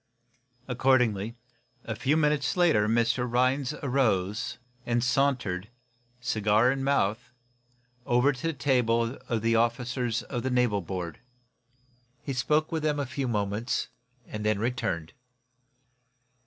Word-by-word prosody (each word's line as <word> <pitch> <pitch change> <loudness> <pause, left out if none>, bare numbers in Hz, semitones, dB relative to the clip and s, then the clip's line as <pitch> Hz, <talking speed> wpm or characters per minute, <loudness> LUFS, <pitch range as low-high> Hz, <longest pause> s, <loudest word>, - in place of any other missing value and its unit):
Accordingly, 120 -4 +2 0.5
a 110 - -4
few 145 +7 +1
minutes 150 0 +1
later, 160 -13 +4
Mr. 120 +2 +1
Rhinds 130 +3 +1
arose, 120 -4 0 0.4
sauntering, 120 -7 0 0.5
cigar 110 0 +2
in 135 0 -2
mouth, 120 -5 0 0.8
over 125 +4 +4
to 140 +6 -4
the 165 - 0
table 125 -4 +1
of 115 -2 -1
the 115 0 +3
officers 120 +1 0
of 120 -3 -4
the 130 - -2
naval 125 -5 +2
board. 90 -2 -5 1.0
He 140 - -3
spoke 150 +5 +1
with 160 -1 -1
them 150 -1 0
a 140 - -1
few 135 +1 -3
moments, 105 0 -1 0.4
then 105 0 -1
returned. 105 -8 -2
120 Hz, 115 wpm, -28 LUFS, 110-135 Hz, 1.0 s, later